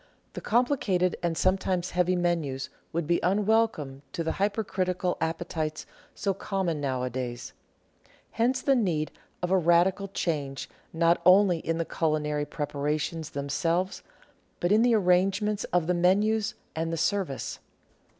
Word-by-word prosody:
The - - -6
complicated 215 -7 +1
and 170 -2 -1
sometimes 185 -1 +1
heavy 180 +1 +2
menus 160 -7 -1 0.2
would 170 0 -1
be 170 +2 +2
unwelcome 195 -8 +1
to 165 - -2
the 160 - -1
hyper 205 +2 0
critical 185 -2 -1
appetites 160 -1 -2 0.3
so 195 - 0
common 185 -5 -2
nowadays; 125 -2 -3 0.8
hence 250 +3 +1
the 275 - +4
need 175 - 0 0.3
of 180 - -1
a 190 - +5
radical 180 +4 +3
change 145 -8 -3 0.2
not 170 +1 +2
only 185 -1 +6
in 165 0 -2
the 165 - -1
culinary 150 -2 -1
preparations 150 +2 -2
themselves, 165 +6 -1 0.6
but 175 - 0
in 215 +2 +5
the 240 -1 +4
arrangements 195 +2 +2
of 175 -2 +1
the 180 - +1
menus, 205 +5 +2 0.2
and 165 +1 -2
the 165 - -2
service. 185 -5 -1
175 Hz, 135 wpm, -27 LUFS, 155-195 Hz, 0.8 s, only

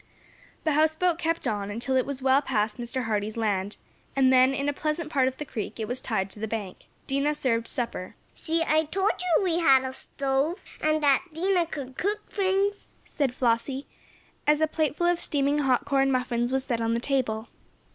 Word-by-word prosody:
The 315 - +1
houseboat 315 +3 +2
kept 330 0 -1
on, 205 -2 -2
until 235 +5 -2
it 260 - +2
was 275 -2 -5
well 265 +1 +4
past 215 -5 -1
Mr. 245 +1 -3
Hardee's 215 -1 -2
land, 205 -3 -1 0.4
and 260 -1 +4
then, 255 +1 +6
in 275 +1 -2
a 290 - +1
pleasant 305 +2 -3
part 265 -4 +3
of 260 - -3
the 300 - -5
creek, 230 -4 -5
it 220 - -2
was 250 +3 -3
tied 195 -3 -1
to 210 - -13
the 220 - -2
bank. 210 -4 -5 0.2
Dinah 280 +2 0
served 230 -5 0
supper. 235 -8 -4 0.2
"See! 330 0 -1
I 315 0 +3
told 385 +6 +1
you 360 +1 +2
we 345 -2 +1
had 270 -6 +5
a 260 0 -4
stove, 275 +6 -1 0.2
and 310 0 +1
that 280 +3 +4
Dinah 355 0 +2
could 270 -5 -7
cook 420 +3 -1
things," 395 +1 0 0.2
said 270 -5 -1
Flossie, 255 +3 0 0.6
as 300 0 +5
a 315 - +4
plate 310 -2 -1
full 345 - 0
of 350 0 +2
steaming 285 -2 +1
hot 265 -4 +2
corn 270 -1 +2
muffins 245 -1 0
was 265 0 +1
set 240 -3 -2
on 230 0 +1
the - - 0
table. 240 -4 -1
270 Hz, 200 wpm, -27 LUFS, 235-315 Hz, 0.6 s, then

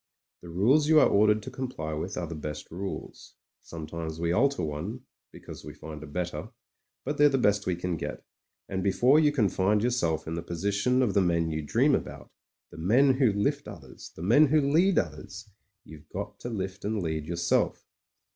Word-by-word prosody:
The 85 - -11
rules 120 - +3
you 155 0 +6
are - - +6
ordered 105 +1 +3
to - - -7
comply 100 -13 -5
with 85 +6 -4
are 90 - -2
the 85 - -7
best 75 -1 -7
rules. 95 +3 -7 0.3
Sometimes 80 0 -7
we 85 0 0
alter 135 +3 +2
one 80 +11 -4 0.2
— - - -65
because - - -11
we 75 0 -9
find 75 0 -9
a 75 - -9
better; 90 +4 -4 0.6
but - - -3
they're 145 0 +7
the 135 - +1
best 105 -5 +1
we 90 - +1
can 90 -1 -3
get, - - -6 0.4
and 95 - -3
before 125 +9 +4
you 150 -2 +4
can 125 -8 +2
find 100 +3 +1
yourself 85 -11 0
in 80 - -3
the 85 - -3
position 100 +9 0
of 105 -6 0
the 100 - +4
men 85 -2 +1
you 80 0 -2
dream 120 - +2
about 70 - -4 0.2
— - - -28
^the - - -10
men 125 +11 +4
who 125 -6 +4
lift 140 +8 -1
others, 80 -11 -11
the 80 - -8
men 120 +11 +5
who 155 +3 +3
lead 180 +5 +4
others 95 +8 -3 0.2
— 100 0 -55
^you've 80 0 -13
got 100 +1 -6
to 120 - -6
lift 95 -3 -5
and 105 -2 -2
lead 80 -2 -3
yourself. 85 0 0
95 Hz, 205 wpm, -28 LUFS, 80-120 Hz, 0.6 s, they're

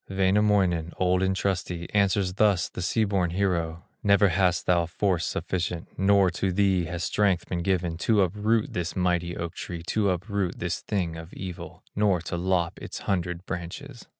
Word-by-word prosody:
Wainamoinen, 95 -3 +2
old 90 0 +2
and 95 0 +1
trusty, 90 -3 -2
Answers 100 -2 +2
thus 100 -2 +2
the - - -6
sea 100 +5 +1
born 95 -4 +1
hero: 85 -3 -1 0.2
"Never 100 0 +4
hast 90 0 +1
thou 85 -2 +2
force 90 0 0
sufficient, 85 -2 -3
Not 95 -1 +3
to 95 +2 -1
thee 95 -2 +2
has 85 +1 -4
strength 95 -3 +1
been 85 -1 -2
given, 85 -2 0
To 105 +3 +3
uproot 105 +4 0
this 85 -1 -3
mighty 90 -1 0
oak 85 -1 -4
tree, 85 -2 -6
To 100 +3 +1
upset 95 0 -2
this 85 0 -2
thing 90 -6 -2
of 80 +1 -9
evil, 90 -2 -8
Nor 100 -3 +3
to 85 - -4
lop 90 -1 0
its - - -7
hundred 90 -2 -2
branches." 105 +9 -7
90 Hz, 170 wpm, -26 LUFS, 85-100 Hz, 0.2 s, Never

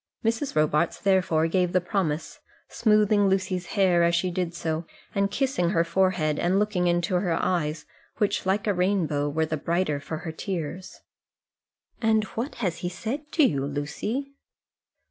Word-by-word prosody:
Mrs. 230 +5 0
Robarts 155 +2 +2
therefore 185 -5 +2
gave 180 +1 +1
the 185 - +4
promise, 175 -4 -2 0.3
smoothing 210 -2 +3
Lucy's 185 -2 -1
hair 185 -3 +4
as 170 0 +3
she 180 +1 0
did 175 -1 -2
so, 160 0 -3 0.3
and 200 0 +1
kissing 255 -8 0
her 165 -1 +2
forehead 170 -3 +1
and 180 +3 +2
looking 200 -4 +1
into 175 +1 +1
her 180 -2 0
eyes, 155 -4 -1 0.3
which, 210 - 0
like 195 +2 0
a 205 - +2
rainbow, 175 -6 +1
were 160 +2 0
the 155 0 -2
brighter 165 -1 0
for 160 +2 -5
her 160 - -3
tears. 180 0 -5 1.0
"And 220 -1 +3
what 240 +6 -3
has 170 -3 -1
he 175 - -2
said 265 - -5
to 315 - +4
you, 140 - +2
Lucy?" 150 - -3
180 Hz, 160 wpm, -26 LUFS, 165-200 Hz, 1.0 s, the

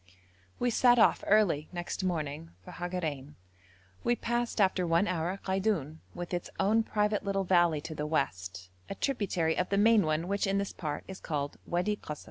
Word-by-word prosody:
We 245 - +1
set 245 +1 +5
off 225 - +4
early 195 -8 +3
next 175 +1 -4
morning 150 - -2 0.2
for - - -9
Hagarein. 160 -6 -4 0.7
We 240 - +2
passed 240 0 -2
after 185 -3 +2
one 170 +4 +3
hour 180 +1 -2
Kaidoun, 190 -6 -1 0.2
with 175 +1 -6
its 175 - -3
own 210 +4 +3
private 210 -1 0
little 195 -1 0
valley 175 -4 +3
to 160 +1 -6
the 150 -1 -3
west, 90 - -2 0.2
a - - -4
tributary 190 - 0
of 180 - -1
the 200 - +1
main 220 +1 +6
one, 155 +2 0
which 200 +1 0
in 195 0 +1
this 200 0 -2
part 150 -3 -4
is 190 0 -8
called 145 -3 -3
Wadi 180 +5 0
Kasr. 150 -6 -7
180 Hz, 180 wpm, -30 LUFS, 155-205 Hz, 0.7 s, main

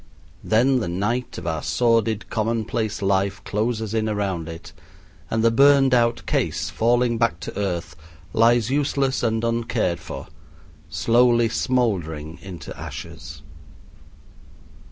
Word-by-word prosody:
Then 125 +4 +3
the 110 - -3
night 105 +8 -2
of 85 - -7
our 80 -2 -2
sordid 115 +4 +1
commonplace 110 -1 -1
life 100 +1 +1
closes 110 0 -2
in 110 -1 0
around 95 -6 -2
it, 80 0 -9 0.6
and 110 0 0
the 115 - +5
burned 140 +1 +5
out 120 -1 +2
case, - - -1
falling 120 0 +2
back 115 -8 +1
to - - -6
earth, 90 -4 -3 0.4
lies 115 +1 +3
useless 140 -1 0
and 115 -1 0
uncared 115 -7 0
for, - - -8 0.6
slowly 120 +4 +3
smoldering 90 - -1
into 90 -4 -8
ashes. 70 +1 -9
110 Hz, 120 wpm, -23 LUFS, 95-120 Hz, 0.6 s, the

